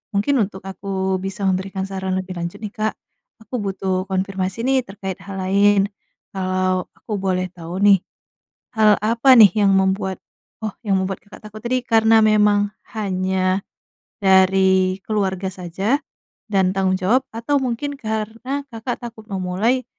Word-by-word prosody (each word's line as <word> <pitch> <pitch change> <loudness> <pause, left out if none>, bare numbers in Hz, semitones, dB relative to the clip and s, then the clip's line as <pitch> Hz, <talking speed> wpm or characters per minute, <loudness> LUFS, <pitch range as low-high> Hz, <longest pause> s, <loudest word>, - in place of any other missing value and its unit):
mungkin 265 +6 +2
untuk 190 -2 -3
aku 190 -1 -2
bisa 195 +1 -5
memberikan 190 +1 -1
saran 190 -1 -3
lebih 185 0 -4
lanjut 170 0 -4
nih 210 - -4
Kak, 215 0 -1 0.5
aku 240 +3 -4
butuh 190 -2 -2
konfirmasi 190 +2 -2
nih 265 0 +3
terkait 195 -1 -6
hal 195 0 -8
lain, 200 +1 +3 0.4
kalau 185 -1 -1
aku 210 -3 -5
boleh 185 -1 0
tahu 175 +1 -7
nih, 200 -2 +7 0.8
hal 215 -1 +6
apa 230 +5 +4
nih 210 -5 +9
yang 195 - +4
membuat 190 0 +1 0.4
oh, 215 -2 -3
yang 195 -2 +2
membuat 190 0 -2
Kakak 205 - -14
takut 215 +1 -11
tadi 255 +1 +1
karena 225 -1 +4
memang 210 -1 +4 0.2
hanya, 190 -2 0 0.6
dari 190 0 +4
keluarga 195 -3 -1
saja, 190 +8 -1 0.5
dan 190 -2 +2
tanggung 190 -1 +1
jawab 225 +8 +2
atau 235 +6 0
mungkin 260 +3 -2
karena 225 +5 -3
Kakak 230 +2 -4
takut 220 -2 -12
memulai, 195 +7 0
195 Hz, 145 wpm, -21 LUFS, 190-220 Hz, 0.8 s, nih